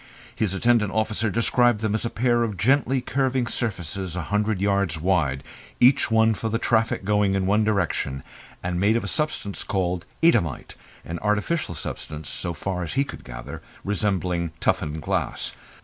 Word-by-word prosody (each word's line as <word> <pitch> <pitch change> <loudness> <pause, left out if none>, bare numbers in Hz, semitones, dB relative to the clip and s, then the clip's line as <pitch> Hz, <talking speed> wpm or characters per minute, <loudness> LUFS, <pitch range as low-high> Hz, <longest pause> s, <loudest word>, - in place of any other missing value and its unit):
His 100 -3 0
attendant 115 -2 +3
officer 110 0 0
described 115 +1 +2
them 110 -2 0
as 110 - 0
a - - 0
pair 120 0 +2
of 110 -4 -1
gently 130 +4 +2
curving 130 -1 0
surfaces 95 -6 -3
a 90 - -2
hundred 105 -1 +1
yards 100 -5 +1
wide, 75 -6 +1 0.4
each 130 +2 +5
one 110 0 +4
for 110 +2 -3
the 115 - 0
traffic 115 -3 +1
going 105 -1 +2
in 95 -1 +1
one 105 +3 +3
direction, 90 -10 0 0.4
and 90 0 -1
made 105 +4 +3
of - - -2
a - - -3
substance 150 -10 -2
called 90 -3 -1 0.2
Eadhamite 105 - +2 0.3
an 85 +1 -5
artificial 105 - 0
substance, 75 0 -6
so 85 - -3
far 90 +3 -3
as 85 - -4
he 135 - +3
could 140 - -9
gather, - - -8 0.2
resembling 90 -4 0
toughened 75 0 0
glass. - - -1
105 Hz, 165 wpm, -24 LUFS, 90-115 Hz, 0.4 s, each